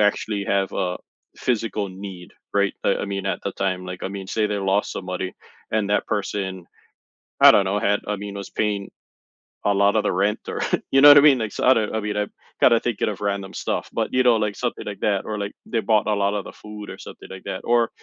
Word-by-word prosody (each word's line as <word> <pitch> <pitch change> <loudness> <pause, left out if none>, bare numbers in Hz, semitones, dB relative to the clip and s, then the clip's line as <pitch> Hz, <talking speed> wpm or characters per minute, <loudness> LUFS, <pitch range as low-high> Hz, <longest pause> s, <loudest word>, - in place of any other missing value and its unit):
actually 105 0 +1
have 100 -1 0
a 90 -2 -1 0.4
physical 110 -4 -1
need, 95 -1 -9 0.2
right? 100 -1 +2
I - - +3
I - - -3
mean, 100 -1 -3
at - - -1
the - - -3
time, 95 -1 -2
like, 90 - -8
I - - -2
mean, 100 -1 -6
say 105 +2 0
they 105 -1 -2
lost 100 +1 +1
somebody 90 0 -4 0.4
and 110 -2 0
that 105 - +1
person, 95 -3 -3 0.8
I - - +11
don't 100 - +4
know, 100 +2 0
had, 105 -1 +2
I 105 - 0
mean, 100 0 -7
I - - -4
was - - -12
paying 105 -2 -1 0.7
a 100 - +4
lot 100 +2 +3
of 110 - +3
the - - +1
rent 100 +3 +1
or, - - -4 0.3
you 135 - +5
know 145 - +10
what 145 - +10
I - - +9
mean? 140 -3 +6
Like, 110 -3 -3
so, - - -4
I 130 - +8
know 110 -4 0
I 110 - 0
mean, 105 0 -3
I'm 105 0 -1 0.3
kinda 115 - +6
thinking 120 -4 -1
of 105 - -6
random 100 -1 -2
stuff. - - -3
But, - - -2
you 130 - +4
know, 120 -2 +5
like 105 -1 -1
something 120 -1 -3
like 100 -1 -6
that, 100 -2 +1
or, 110 - -3
like, 100 0 -4
they 115 - -1
bought 110 -2 +2
a 105 - +2
lot 100 0 +1
of 105 -1 -2
the - - -8
food 105 -1 -10
or - - -8
something - - -11
like 95 -1 -9
that. 95 - -4
Or, 120 -1 +3
100 Hz, 250 wpm, -23 LUFS, 100-110 Hz, 0.8 s, I